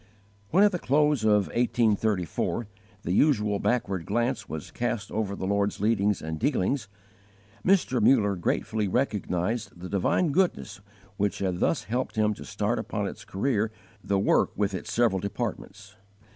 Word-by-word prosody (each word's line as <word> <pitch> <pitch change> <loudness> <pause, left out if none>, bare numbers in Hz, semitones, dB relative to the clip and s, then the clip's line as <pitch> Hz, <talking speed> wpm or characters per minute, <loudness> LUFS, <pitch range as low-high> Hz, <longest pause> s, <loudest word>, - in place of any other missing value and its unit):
When, 190 +5 +5
at 210 - +5
the 180 - -2
close 145 0 +2
of 105 -2 +4
1834, 110 -4 0 0.4
the 85 - -2
usual 105 -4 +2
backward 100 -8 -1
glance 120 +2 -1
was 80 -1 -6
cast 115 -3 -3
over 105 -2 -2
the 95 - -4
Lord's 100 +1 0
leadings 105 -1 +1
and 80 0 -4
dealings, 130 - 0 0.8
Mr. 175 - +2
Muller 105 -3 +4
gratefully 105 +4 -1
recognized 105 -2 -1
the 90 +1 -7
divine 120 - +1
goodness 180 - 0 0.4
which 100 0 0
had 90 -3 -2
thus 165 - +1
helped 120 0 -3
him 105 -1 +2
to - - -10
start - - -1
upon - - -3
its - - -8
career 110 +1 0 0.3
the 100 - +1
work 95 - +3
with 100 0 0
its 95 - -5
several 115 -5 +2
departments. 100 +1 -5
105 Hz, 150 wpm, -27 LUFS, 100-125 Hz, 0.8 s, When